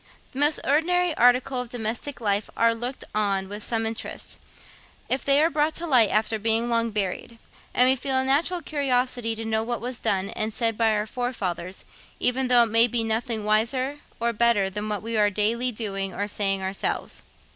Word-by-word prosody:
The 265 Hz, -, -7 dB
most 295 Hz, +1 st, +5 dB
ordinary 345 Hz, +4 st, +2 dB
articles 250 Hz, +1 st, +2 dB
of -, -, -13 dB
domestic 240 Hz, +4 st, -4 dB
life 205 Hz, -2 st, -1 dB
are 230 Hz, 0 st, +3 dB
looked 245 Hz, +3 st, -5 dB
on 200 Hz, -2 st, 0 dB
with 205 Hz, +2 st, -7 dB
some 225 Hz, +1 st, -1 dB
interest, 225 Hz, 0 st, -6 dB, 0.7 s
if 260 Hz, -, -1 dB
they 280 Hz, +2 st, +4 dB
are 330 Hz, -, +2 dB
brought 300 Hz, +1 st, 0 dB
to 345 Hz, -, -4 dB
light 250 Hz, -9 st, +5 dB
after 220 Hz, +1 st, 0 dB
being 225 Hz, +2 st, +1 dB
long 230 Hz, 0 st, +1 dB
buried; 210 Hz, +2 st, -4 dB, 0.3 s
and 250 Hz, -, +4 dB
we 260 Hz, -, +4 dB
feel 265 Hz, +1 st, 0 dB
a 260 Hz, -, +2 dB
natural 320 Hz, +6 st, +1 dB
curiosity 250 Hz, -5 st, 0 dB
to 225 Hz, +1 st, -6 dB
know 220 Hz, 0 st, 0 dB
what 235 Hz, +1 st, -3 dB
was 245 Hz, +1 st, -4 dB
done 195 Hz, 0 st, -1 dB
and 215 Hz, 0 st, -2 dB
said 225 Hz, -2 st, +1 dB
by 225 Hz, -1 st, +2 dB
our 210 Hz, 0 st, -1 dB
forefathers, 195 Hz, -7 st, -4 dB, 0.3 s
even 255 Hz, +1 st, +1 dB
though 245 Hz, -1 st, +6 dB
it 225 Hz, -, -2 dB
may 230 Hz, +1 st, +5 dB
be 235 Hz, -1 st, 0 dB
nothing 225 Hz, 0 st, -1 dB
wiser 255 Hz, +7 st, +1 dB, 0.2 s
or 235 Hz, 0 st, 0 dB
better 210 Hz, -4 st, +2 dB
than 210 Hz, +2 st, -4 dB
what 210 Hz, -1 st, -3 dB
we 230 Hz, 0 st, -3 dB
are 210 Hz, -1 st, +4 dB
daily 225 Hz, +5 st, 0 dB
doing 195 Hz, -4 st, -4 dB
or 205 Hz, -, -2 dB
saying 195 Hz, -2 st, 0 dB
ourselves. 190 Hz, +1 st, -3 dB
230 Hz, 195 wpm, -24 LUFS, 210-255 Hz, 0.7 s, though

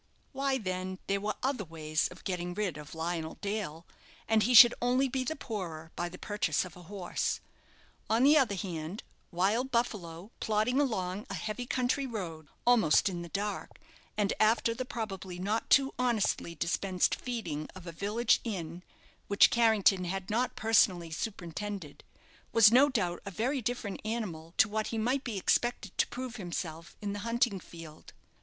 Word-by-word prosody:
Why, 275 Hz, -1 st, 0 dB
then, 185 Hz, -3 st, -3 dB
there 200 Hz, 0 st, 0 dB
were 210 Hz, +1 st, -2 dB
other 260 Hz, -5 st, 0 dB
ways 155 Hz, -2 st, -1 dB
of 180 Hz, -, -14 dB
getting 180 Hz, -1 st, -3 dB
rid 205 Hz, -4 st, -1 dB
of 150 Hz, +1 st, -9 dB
Lionel 160 Hz, 0 st, -3 dB
Dale, 200 Hz, -6 st, -4 dB, 0.4 s
and 220 Hz, -1 st, +4 dB
he 245 Hz, +4 st, +3 dB
should 235 Hz, +1 st, +11 dB
only 250 Hz, +3 st, +3 dB
be 260 Hz, 0 st, -1 dB
the 315 Hz, +5 st, -2 dB
poorer 170 Hz, -, -6 dB
by 175 Hz, 0 st, -2 dB
the 180 Hz, -, -10 dB
purchase 190 Hz, -7 st, 0 dB
of 180 Hz, -, -11 dB
a 180 Hz, -, -12 dB
horse. 180 Hz, 0 st, -2 dB, 0.7 s
On 225 Hz, +3 st, +3 dB
the 290 Hz, +3 st, +7 dB
other 260 Hz, -9 st, +3 dB
hand, 175 Hz, 0 st, -5 dB, 0.3 s
"Wild 205 Hz, +9 st, +1 dB
Buffalo," 210 Hz, -6 st, -2 dB
plodding 220 Hz, +5 st, +1 dB
along 205 Hz, -4 st, -2 dB
a -, -, -3 dB
heavy 225 Hz, +3 st, -4 dB
country 260 Hz, +2 st, 0 dB
road, 170 Hz, -, -6 dB, 0.2 s
almost 220 Hz, -8 st, +5 dB
in 175 Hz, -2 st, -4 dB
the 170 Hz, -, -8 dB
dark, 205 Hz, +3 st, -4 dB, 0.4 s
and 210 Hz, -1 st, +1 dB
after 225 Hz, +1 st, +3 dB
the 255 Hz, +2 st, -4 dB
probably 195 Hz, -7 st, -5 dB
not 205 Hz, +5 st, -1 dB
too 275 Hz, 0 st, +5 dB
honestly 225 Hz, -8 st, 0 dB
dispensed 180 Hz, +3 st, 0 dB
feeding 170 Hz, -12 st, -4 dB
of 185 Hz, -2 st, -10 dB
a 170 Hz, -, -5 dB
village 210 Hz, +7 st, +1 dB
inn, 175 Hz, -6 st, -4 dB, 0.5 s
which 200 Hz, -, +6 dB
Carrington 215 Hz, -5 st, +4 dB
had 190 Hz, +2 st, -4 dB
not 245 Hz, +4 st, 0 dB
personally 185 Hz, -6 st, +3 dB
superintended, 190 Hz, -2 st, -5 dB, 0.5 s
was 225 Hz, -2 st, +7 dB
no 265 Hz, +4 st, +6 dB
doubt 180 Hz, -9 st, -1 dB
a 200 Hz, -, -5 dB
very 250 Hz, +8 st, -1 dB
different 225 Hz, -3 st, -3 dB
animal 185 Hz, -8 st, -4 dB
to -, -, +6 dB
what 215 Hz, +1 st, -2 dB
he 225 Hz, -, -3 dB
might 250 Hz, +5 st, 0 dB
be 225 Hz, -5 st, -4 dB
expected 215 Hz, +1 st, 0 dB
to -, -, +4 dB
prove 250 Hz, -1 st, -6 dB
himself 170 Hz, -3 st, -5 dB
in 200 Hz, -1 st, -2 dB
the 205 Hz, -, -4 dB
hunting 230 Hz, -1 st, +1 dB
field. 165 Hz, -3 st, -12 dB
205 Hz, 170 wpm, -31 LUFS, 175-235 Hz, 0.7 s, should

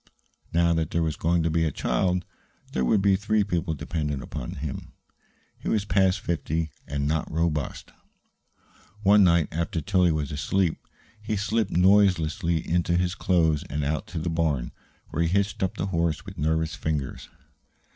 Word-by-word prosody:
Now 85 Hz, 0 st, +3 dB
that 80 Hz, -2 st, 0 dB
there 85 Hz, -, 0 dB
was 80 Hz, -2 st, -1 dB
going 85 Hz, 0 st, +1 dB
to 80 Hz, -, +1 dB
be 80 Hz, +1 st, +2 dB
a 80 Hz, -, +1 dB
child, 90 Hz, +5 st, 0 dB, 0.5 s
there 65 Hz, -, 0 dB
would 95 Hz, -, +2 dB
be 100 Hz, -1 st, +5 dB
three 105 Hz, +1 st, +1 dB
people 85 Hz, -4 st, -1 dB
dependent 75 Hz, -2 st, -3 dB
upon -, -, -6 dB
him. 70 Hz, -1 st, -6 dB, 0.7 s
He -, -, -4 dB
was 105 Hz, -2 st, +1 dB
past 95 Hz, -2 st, +2 dB
fifty, 80 Hz, -1 st, -2 dB, 0.2 s
and 70 Hz, 0 st, -2 dB
not 80 Hz, +1 st, -1 dB
robust. 80 Hz, -3 st, -2 dB, 1.1 s
One 100 Hz, +1 st, +6 dB
night, 85 Hz, -3 st, +4 dB
after 85 Hz, +1 st, -2 dB
Tillie 90 Hz, -1 st, +2 dB
was 75 Hz, -3 st, -2 dB
asleep, 80 Hz, +4 st, 0 dB, 0.4 s
he 110 Hz, 0 st, -2 dB
slipped 105 Hz, +1 st, 0 dB
noiselessly 90 Hz, -3 st, +3 dB
into 85 Hz, +1 st, +1 dB
his 90 Hz, 0 st, 0 dB
clothes 80 Hz, -6 st, +2 dB
and 75 Hz, +1 st, -2 dB
out 75 Hz, +2 st, -2 dB
to 90 Hz, -, -7 dB
the 80 Hz, +2 st, -2 dB
barn, 75 Hz, -7 st, 0 dB, 0.4 s
where -, -, -2 dB
he 85 Hz, -, +2 dB
hitched 100 Hz, +2 st, 0 dB
up 95 Hz, -, -1 dB
the 85 Hz, -, -1 dB
horse 85 Hz, -2 st, 0 dB
with -, -, -9 dB
nervous 80 Hz, +2 st, 0 dB
fingers. 75 Hz, -4 st, -3 dB
85 Hz, 165 wpm, -26 LUFS, 80-95 Hz, 1.1 s, One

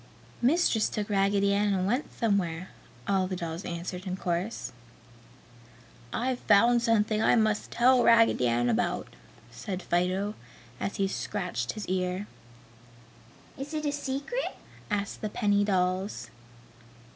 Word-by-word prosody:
"Mistress 250 Hz, -4 st, +3 dB
took 210 Hz, -1 st, -3 dB
Raggedy 200 Hz, 0 st, +2 dB
Ann 205 Hz, 0 st, +2 dB
and 185 Hz, -1 st, 0 dB
went 245 Hz, +9 st, -1 dB
somewhere!" 185 Hz, -6 st, -1 dB, 0.4 s
all 190 Hz, -2 st, +2 dB
the 185 Hz, -, -3 dB
dolls 170 Hz, 0 st, -5 dB
answered 180 Hz, +2 st, -5 dB
in 185 Hz, 0 st, -3 dB
chorus. 175 Hz, -, -2 dB, 1.4 s
"I've 250 Hz, +1 st, -1 dB
found 235 Hz, +4 st, +4 dB
something 215 Hz, -2 st, +2 dB
I -, -, +4 dB
must 215 Hz, -2 st, +1 dB
tell 250 Hz, +1 st, +4 dB
Raggedy 230 Hz, -, +5 dB
Ann 120 Hz, +1 st, +1 dB
about!" 115 Hz, -2 st, 0 dB, 0.4 s
said 180 Hz, +10 st, -5 dB
Fido, 185 Hz, +4 st, 0 dB, 0.5 s
as 195 Hz, -, -3 dB
he 195 Hz, -, +1 dB
scratched 180 Hz, -, -3 dB
his 215 Hz, -, -6 dB
ear. 185 Hz, +1 st, -1 dB, 1.3 s
"Is 285 Hz, +3 st, -5 dB
it 305 Hz, 0 st, -2 dB
a 290 Hz, -, +1 dB
secret?" 285 Hz, -, -3 dB, 0.3 s
asked 205 Hz, -1 st, -2 dB
the 215 Hz, -, -2 dB
penny 205 Hz, -1 st, +2 dB
dolls. 190 Hz, 0 st, -1 dB
200 Hz, 130 wpm, -28 LUFS, 180-230 Hz, 1.4 s, Raggedy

